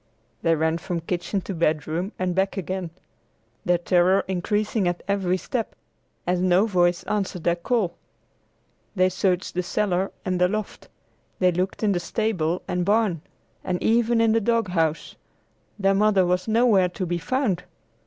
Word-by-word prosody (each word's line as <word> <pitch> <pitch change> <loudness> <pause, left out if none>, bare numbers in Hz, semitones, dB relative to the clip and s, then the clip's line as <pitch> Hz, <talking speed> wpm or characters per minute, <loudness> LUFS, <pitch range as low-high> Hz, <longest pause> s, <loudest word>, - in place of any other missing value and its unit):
They 165 -1 +3
ran 160 +1 0
from 170 0 -3
kitchen 180 +3 -2
to 195 - -5
bedroom 160 +3 -1
and 185 -1 -1
back 190 +2 0
again, 185 -1 -3 0.8
their 175 0 +3
terror 180 +2 +3
increasing 205 +2 0
at 175 0 -2
every 190 -2 +1
step, 230 +4 -4 0.5
as 180 0 +1
no 185 +2 +4
voice 175 -4 +2
answered 195 -5 -2
their 170 - +2
call. 185 0 0 1.0
They 185 -1 +3
searched 185 -1 0
the 180 - 0
cellar 185 0 -1
and 185 -1 -1
the 180 - +5
loft; 215 +2 -5 0.5
they 185 -1 +3
looked 185 +5 -2
in 210 - +3
the 180 - +1
stable 175 -2 -1
and 180 -1 -1
barn, 205 -4 +1 0.4
and 180 - -1
even 230 0 +3
in 225 -1 +4
the 225 +1 +2
dog 230 -2 +1
house. 165 -3 -1 0.6
Their 195 -1 +2
mother 200 -2 +3
was 180 +2 0
nowhere 220 -5 +4
to 185 +1 -4
be 175 0 -2
found! 205 -5 -1
185 Hz, 160 wpm, -24 LUFS, 175-205 Hz, 1.0 s, the